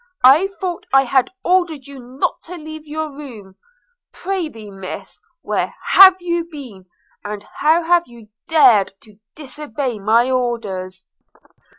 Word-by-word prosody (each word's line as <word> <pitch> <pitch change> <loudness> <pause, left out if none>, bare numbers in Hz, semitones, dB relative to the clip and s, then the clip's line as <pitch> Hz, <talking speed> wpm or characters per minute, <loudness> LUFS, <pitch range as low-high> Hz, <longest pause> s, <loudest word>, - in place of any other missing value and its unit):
I 285 +9 +7
thought 360 -3 -4
I 270 +1 +5
had 260 0 +1
ordered 345 -7 +1
you 280 -1 -11
not 250 +2 -3
to 360 - -8
leave 310 -1 -9
your 305 -1 -5
room. 230 -10 -11 0.6
Pr'ythee, 320 - -5
Miss, 195 -1 -9 0.2
where - - -2
have 380 -1 +9
you 340 -1 -2
been? 245 - -10 0.4
and 205 0 -6
how 320 +3 +3
have 345 +1 +2
you 235 -3 -16 0.2
dared 250 - +5
to 215 -2 -19 0.2
disobey 275 -4 -5
my 230 +5 +2
orders?' 200 -7 -3
270 Hz, 130 wpm, -19 LUFS, 220-315 Hz, 0.6 s, have